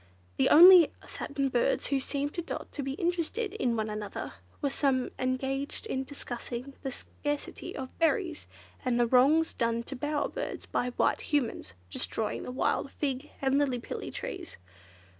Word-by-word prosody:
The - - +4
only 350 0 +10
satin 275 -2 -2
birds 245 -2 +1
who 275 - +1
seemed 285 +2 -2
to 345 - -2
Dot 335 - -6
to 290 - -4
be 270 0 -3
interested 350 +6 -1
in 250 - 0
one 220 -1 -1
another, 210 -1 -5 0.3
were 280 -2 0
some 265 -3 +1
engaged 265 +6 -2
in 265 -11 -2
discussing 250 -1 -6
the 270 - -3
scarcity 290 +3 -5
of 260 -1 -6
berries 335 -1 +1 0.4
and 250 -2 +1
the 240 - +5
wrongs 280 +7 +4
done 230 0 0
to 270 - -7
bower 295 +3 -1
birds - - -5
by 250 - -1
White - - +2
Humans 240 - -1 0.2
destroying 220 - -2
the - - -5
wild 260 +2 0
fig 275 0 -2
and 270 +1 +3
lillipilli 250 -4 -2
trees. 380 -9 -6
275 Hz, 160 wpm, -30 LUFS, 250-310 Hz, 0.4 s, only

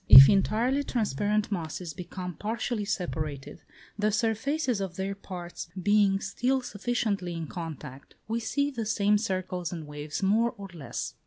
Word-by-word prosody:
If 135 +4 +13
entirely 230 +8 +2
transparent 210 - 0
masses 170 -2 -3
become 180 +1 -6
partially 220 +3 -2
separated, 155 -8 -3 0.4
the 210 +1 +2
surfaces 235 +3 0
of 190 -3 -4
their 195 +1 -2
parts 175 -4 -7
being 200 0 +4
still 250 +7 0
sufficiently 205 -5 -1
in 165 -1 -3
contact, 155 -5 -8
we 225 +2 0
see 280 +5 0
the 230 -5 -3
same 210 -1 +3
circles 185 -4 -2
and 165 -3 -5
waves 150 +4 -5
more 225 +5 +3
or 200 -1 -8
less. 155 -5 -5
200 Hz, 145 wpm, -28 LUFS, 175-220 Hz, 0.4 s, If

